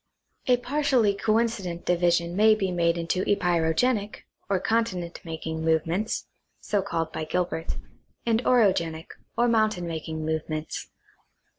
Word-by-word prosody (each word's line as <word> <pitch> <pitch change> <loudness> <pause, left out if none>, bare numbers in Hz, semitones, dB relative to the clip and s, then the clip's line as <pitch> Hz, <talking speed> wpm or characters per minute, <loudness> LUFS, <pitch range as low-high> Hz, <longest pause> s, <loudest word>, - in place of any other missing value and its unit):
A 250 -1 +5
partially 250 -5 +2
coincident 215 -4 0
division 170 -1 +2
may 215 +2 +6
be 195 -3 -1
made 170 -1 +2
into 170 +2 -1
epeirogenic, 200 +5 +1 0.3
or 195 -2 +2
continent 185 -6 -1
making 160 -1 -5
movements 165 +6 0 0.3
(so 205 -1 0
called 165 -4 -3
by - - -3
Gilbert), 170 0 -2 0.5
and 230 +1 +2
orogenic, 175 -9 +2 0.3
or 240 - +4
mountain 215 -6 +2
making 160 -1 -4
movements. 155 0 -3
180 Hz, 120 wpm, -26 LUFS, 165-220 Hz, 0.5 s, may